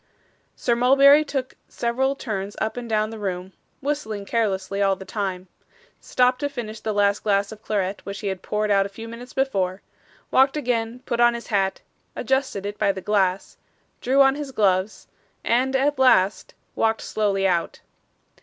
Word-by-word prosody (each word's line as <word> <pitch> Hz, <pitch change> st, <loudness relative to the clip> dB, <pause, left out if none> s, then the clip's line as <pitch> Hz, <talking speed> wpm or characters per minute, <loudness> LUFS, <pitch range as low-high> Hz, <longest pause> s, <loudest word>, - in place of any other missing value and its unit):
Sir 235 Hz, -, 0 dB
Mulberry 275 Hz, +4 st, +6 dB
took 275 Hz, -3 st, -4 dB
several 260 Hz, +3 st, -1 dB
turns 205 Hz, -6 st, -4 dB
up 220 Hz, -, -2 dB
and 245 Hz, -1 st, -6 dB
down 215 Hz, 0 st, 0 dB
the 225 Hz, -, -8 dB
room, 185 Hz, -2 st, -4 dB, 0.3 s
whistling 220 Hz, -9 st, -3 dB
carelessly 200 Hz, -3 st, -1 dB
all 195 Hz, -1 st, +3 dB
the 190 Hz, -, -11 dB
time; 190 Hz, -3 st, -4 dB, 0.5 s
stopped 250 Hz, 0 st, +1 dB
to 285 Hz, -, -1 dB
finish 225 Hz, -6 st, -6 dB
the 220 Hz, -, -3 dB
last 205 Hz, -1 st, +2 dB
glass 200 Hz, -1 st, +1 dB
of 215 Hz, -1 st, -11 dB
claret 200 Hz, -2 st, -2 dB
which 200 Hz, -1 st, -7 dB
he 205 Hz, -, -3 dB
had 190 Hz, -1 st, -4 dB
poured 210 Hz, 0 st, -1 dB
out 195 Hz, -1 st, +4 dB
a 200 Hz, -, -6 dB
few 225 Hz, +3 st, -9 dB
minutes 235 Hz, +2 st, -9 dB
before, 195 Hz, -9 st, -1 dB, 0.5 s
walked 270 Hz, +3 st, +4 dB
again, 240 Hz, -2 st, -2 dB
put 235 Hz, -, -2 dB
on 240 Hz, 0 st, +5 dB
his 235 Hz, -, -7 dB
hat, 195 Hz, -1 st, +1 dB, 0.3 s
adjusted 265 Hz, -7 st, -1 dB
it 205 Hz, 0 st, -5 dB
by 200 Hz, -, +3 dB
the 195 Hz, -, -6 dB
glass, 190 Hz, -1 st, 0 dB, 0.4 s
drew 270 Hz, +3 st, +4 dB
on 270 Hz, 0 st, +4 dB
his 285 Hz, -1 st, -6 dB
gloves, 195 Hz, -3 st, 0 dB, 0.4 s
and, 255 Hz, +3 st, +1 dB
at 280 Hz, +1 st, +1 dB
last, 205 Hz, -7 st, +3 dB, 0.2 s
walked 225 Hz, 0 st, +1 dB
slowly 200 Hz, -2 st, 0 dB
out. 175 Hz, -2 st, -1 dB
220 Hz, 175 wpm, -23 LUFS, 195-255 Hz, 0.5 s, Mulberry